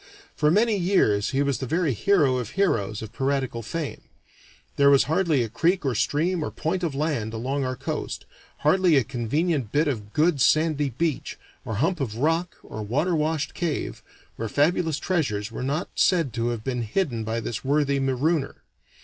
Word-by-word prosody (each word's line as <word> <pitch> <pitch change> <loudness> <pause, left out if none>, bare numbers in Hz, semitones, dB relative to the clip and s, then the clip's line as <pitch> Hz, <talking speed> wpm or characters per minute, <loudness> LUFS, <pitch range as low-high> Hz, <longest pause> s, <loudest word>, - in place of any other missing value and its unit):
For 150 - +2
many 215 +5 +3
years 170 - +2
he 135 +1 +1
was 140 -2 0
the 130 - -4
very 165 -1 +1
hero 140 - +3
of 120 -4 -3
heroes 110 - +1
of 110 +1 -9
piratical 130 -2 -1
fame; 155 +6 -5 0.7
there 140 0 +5
was 140 -1 +6
hardly 160 -4 +1
a - - -3
creek 165 - +1
or 135 - +1
stream 165 - 0
or - - -2
point 170 +4 -2
of 165 -6 -2
land 135 -7 -1
along 135 +5 -2
our 130 0 -2
coast, - - -4 0.4
hardly 175 +1 +4
a 135 - +4
convenient 135 - -1
bit 150 +2 +2
of 105 -7 -3
good 155 0 +2
sandy 155 -1 +3
beach, 155 +4 -2 0.3
or 110 - -4
hump 165 - 0
of 115 -6 -3
rock, 165 +6 0
or 110 - -7
water 150 - 0
washed 155 -1 -1
cave, 170 -4 -3 0.4
where 115 - -3
fabulous 160 - +1
treasures 125 - -1
were 115 - -6
not 140 +7 -1
said 165 - +2
to 115 -1 -1
have 120 -2 -3
been 125 -1 -2
hidden 120 - -1
by 115 +1 -2
this 115 -1 -4
worthy 140 0 +1
marooner. 135 +3 0
140 Hz, 180 wpm, -25 LUFS, 120-165 Hz, 0.7 s, was